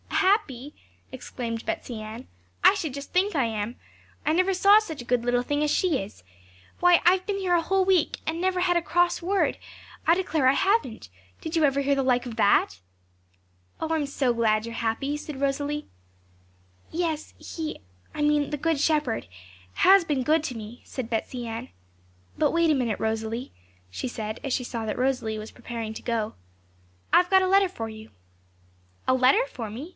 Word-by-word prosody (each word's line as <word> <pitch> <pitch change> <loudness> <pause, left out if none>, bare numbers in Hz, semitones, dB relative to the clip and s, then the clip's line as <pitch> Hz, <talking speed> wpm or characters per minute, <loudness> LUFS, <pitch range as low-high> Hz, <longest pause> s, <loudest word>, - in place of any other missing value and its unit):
'Happy?' 295 - +1 0.4
exclaimed 235 -3 -5
Betsey 290 -9 -4
Ann; 220 +4 -8 0.4
'I 375 - +8
should 320 -9 -3
just 280 0 -8
think 375 +1 +2
I 270 -4 +2
am! 220 +1 -3 0.5
I 310 - +2
never 370 +3 +2
saw 400 +3 +7
such 320 - -6
a - - -10
good 245 -1 +1
little 245 0 +1
thing 290 +3 0
as 300 - +1
she 355 -8 +2
is. 195 - -13 0.6
Why, 355 -1 +6
I've 370 +1 +4
been 405 -1 -1
here 375 -2 0
a 345 - +4
whole 380 +3 +1
week, 370 -4 +2
and 325 +1 -2
never 370 0 +1
had 355 -1 +2
a 345 - +3
cross 350 +1 +1
word, 385 +3 +1 0.5
I 330 - +6
declare 325 -7 +1
I 260 - +6
haven't; 285 - 0 0.3
did 320 - -5
you 325 - +3
ever 280 -1 +3
hear 280 0 +2
the 275 - +1
like 250 -1 +2
of 240 -2 -6
that?' 200 - +3 1.0
'Oh, 320 - -3
I 325 - +1
am 295 -2 -1
so 270 -3 0
glad 220 -2 +1
you 230 - -6
are - - -8
happy!' 235 +6 -1
said 295 -2 -7
Rosalie. 285 +2 -1 1.0
'Yes, 320 -2 -3
He 320 -2 -6 0.3
I - - -4
mean 295 -1 +2
the 295 - -3
Good 320 +1 0
Shepherd 300 - 0 0.5
has 385 0 +6
been 290 -5 -1
good 310 +3 +2
to 250 -6 -4
me,' 220 +2 -9
said 255 -4 -6
Betsey 240 +2 -3
Ann. 225 0 -6 0.7
'But - - +2
wait 335 -1 +3
a - - +3
minute, 240 -5 -1
Rosalie,' 225 +2 -3 0.4
she 175 - -4
said, 220 -1 -5
as 275 - -3
she 250 - 0
saw 230 -2 -4
that 215 - -3
Rosalie 250 -4 0
was 215 +1 -8
preparing 230 -2 -6
to - - -8
go. 225 -3 -2 0.8
'I've 360 0 +5
got 380 -1 +5
a - - +1
letter 390 0 +4
for 225 -11 -5
you.' 220 0 -10 1.0
'A - - +4
letter 260 - +4
for 240 - -7
me?' 255 +10 -7
280 Hz, 195 wpm, -26 LUFS, 235-340 Hz, 1.0 s, I